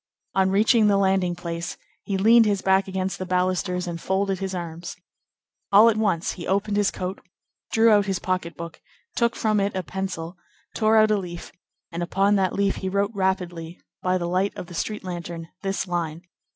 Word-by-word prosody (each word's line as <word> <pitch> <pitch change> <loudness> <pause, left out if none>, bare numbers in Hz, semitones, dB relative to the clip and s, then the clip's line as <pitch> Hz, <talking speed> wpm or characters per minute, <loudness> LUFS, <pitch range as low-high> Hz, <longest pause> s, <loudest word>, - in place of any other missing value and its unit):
On 190 0 +3
reaching 215 +3 +4
the 200 -1 +4
landing 190 -2 +2
place, 170 -1 -5 0.3
he 195 - -1
leaned 225 +3 +6
his 200 -2 0
back 190 0 +3
against 190 -2 -3
the 185 - -3
balusters 180 0 0
and 170 -1 -5
folded 190 0 0
his 190 -1 -3
arms. 170 -1 -6 0.8
All 210 +3 +8
at 225 - +1
once 195 -6 0
he 175 - -7
opened 200 +2 0
his 205 -1 +3
coat, 185 +1 -5 0.5
drew 225 0 +5
out 205 -2 +4
his 195 -1 0
pocket 180 -2 -3
book, 170 -1 -8 0.3
took 235 -1 +1
from 215 -1 +1
it 200 0 -1
a 185 - -1
pencil, 185 -1 -5 0.4
tore 220 0 +3
out 215 0 +5
a 210 - +3
leaf, 175 -3 -7 0.4
and 170 0 -4
upon 195 +4 +2
that 190 -1 +1
leaf 200 0 +1
he 190 - -3
wrote 200 +2 0
rapidly, 180 -3 -2 0.2
by 185 0 +1
the 175 -1 -3
light 185 +3 0
of - - -5
the 175 - -12
street 210 +5 -3
lantern, 170 -2 -6
this 195 -1 -2
line: 170 -2 -2
_M. - - -35
190 Hz, 195 wpm, -24 LUFS, 175-200 Hz, 0.8 s, All